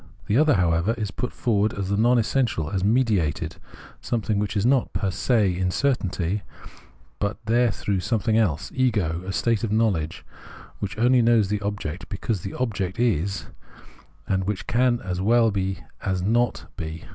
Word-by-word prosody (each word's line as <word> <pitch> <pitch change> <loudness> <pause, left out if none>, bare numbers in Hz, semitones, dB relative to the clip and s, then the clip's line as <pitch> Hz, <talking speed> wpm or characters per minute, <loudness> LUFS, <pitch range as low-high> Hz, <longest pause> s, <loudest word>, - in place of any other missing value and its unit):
The 105 - 0
other, 150 0 +5
however, 90 +4 +2
is 105 -3 -3
put 125 +6 -4
forward 105 -3 +1
as 100 -1 -3
the 100 - +1
non 120 +4 +4
essential, 115 - 0
as 95 -2 -1
mediated, 105 - +1 0.4
something 110 -3 -1
which 105 0 -1
is 100 - +1
not 130 0 +2
per 100 -3 0
se 105 -3 +2
in 90 +1 0
the - - 0
certainty, 100 -7 0 0.8
but 100 +1 -1
there 120 +2 +3
through 100 -1 -2
something 110 +4 0
else, 95 -4 +1
ego, 105 -11 +1
a - - -2
state 115 +3 0
of 110 - -1
knowledge 100 -8 0 0.5
which 100 0 -4
only 125 +2 +4
knows 115 -4 +3
the 105 -1 -1
object 100 -4 -4
be 100 - -4
cause 105 -4 -2
the 95 - -6
object 100 -6 -2
is, 100 -5 0 0.8
and 95 -1 0
which 100 -1 -3
can 120 0 +2
as 90 -1 -3
well 115 +2 +4
be 95 -1 -1 0.2
as 95 -2 -1
not 120 +4 +1
be. 80 0 -6
105 Hz, 175 wpm, -24 LUFS, 95-115 Hz, 0.8 s, other